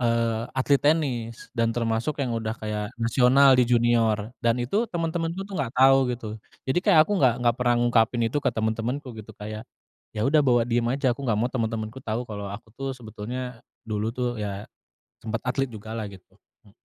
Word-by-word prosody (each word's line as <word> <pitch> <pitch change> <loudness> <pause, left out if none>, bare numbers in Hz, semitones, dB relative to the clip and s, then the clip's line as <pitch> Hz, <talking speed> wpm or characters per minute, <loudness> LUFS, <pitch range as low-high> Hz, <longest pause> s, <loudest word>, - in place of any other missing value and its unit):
eee, 115 -1 +1
atlet 140 +1 +3
tenis 130 -7 0
dan 115 0 +1
termasuk 115 +4 -1
yang 125 -3 -1
udah 110 -1 -2
kayak 105 -1 -4
nasional 125 +4 +5
di 125 - +6
junior 115 -2 +2
dan 115 0 +2
itu 205 - 0
temen-temenku 165 +1 -2
tuh 200 0 -9
gak 130 -5 -2
tau 135 0 +6
gitu, 120 -2 -4 0.4
jadi 130 +6 +1
kayak 190 -4 +4
aku 205 - -3
gak 125 -4 +5
gak 120 -1 +4
pernah 120 -1 +3
ngungkapin 120 0 +2
itu 115 +6 0
ke - - +1
temen-temenku 115 +5 -2
gitu 105 - -10
kayak, 105 +1 -6 0.5
ya 105 - 0
udah 150 +4 +4
bawa 125 -4 +4
diem 120 0 0
aja 130 0 +1
aku 120 - -9
gak 105 - +2
mau 120 +2 0
temen-temenku 115 0 -2
tau 115 0 -2
kalo 100 -3 -6
aku 105 +3 -9
tuh 135 0 -3
sebetulnya, 120 +2 -6 0.3
dulu 105 0 -1
tuh 125 -1 -1
ya, 100 0 -4 0.6
sempat 110 0 -2
atlet 135 +1 0
juga 110 0 -9
lah 110 - -3
gitu. 95 -2 -16 0.3
E - - -20
120 Hz, 190 wpm, -25 LUFS, 110-130 Hz, 0.6 s, di